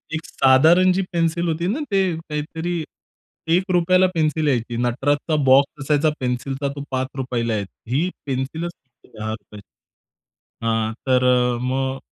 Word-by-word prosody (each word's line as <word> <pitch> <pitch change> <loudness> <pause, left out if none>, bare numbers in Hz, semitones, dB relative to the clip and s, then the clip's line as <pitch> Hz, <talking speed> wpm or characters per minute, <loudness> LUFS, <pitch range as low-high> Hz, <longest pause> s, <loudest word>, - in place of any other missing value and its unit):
एक 160 - -5
साधारण 160 +8 +5
जी 190 - +1
पेन्सिल 170 0 0
होती 165 +1 -1
ना 225 +10 -1
ते 195 -1 +3 0.2
काहीतरी 160 +2 -4 0.7
₹1ला 185 0 +3
पेन्सिल 155 -1 +1
यायची. 120 -3 0
नटराचा 140 +6 0
बॉक्स 135 +2 +4
असायचा 150 +2 +2
पेन्सिलचा 135 +2 -2
तो 140 - -5
₹5ला 130 -3 -2
यायची. 100 -2 -4 0.2
ही 170 +6 +1 0.2
पेन्सिलच 140 +5 -3
फक्त 130 -5 -27
₹10ची 110 -2 -7 1.0
हां. 110 -1 0
तर 130 -1 +3
अ, 125 -1 +3
मग 130 +1 -1
140 Hz, 130 wpm, -21 LUFS, 125-165 Hz, 1.0 s, साधारण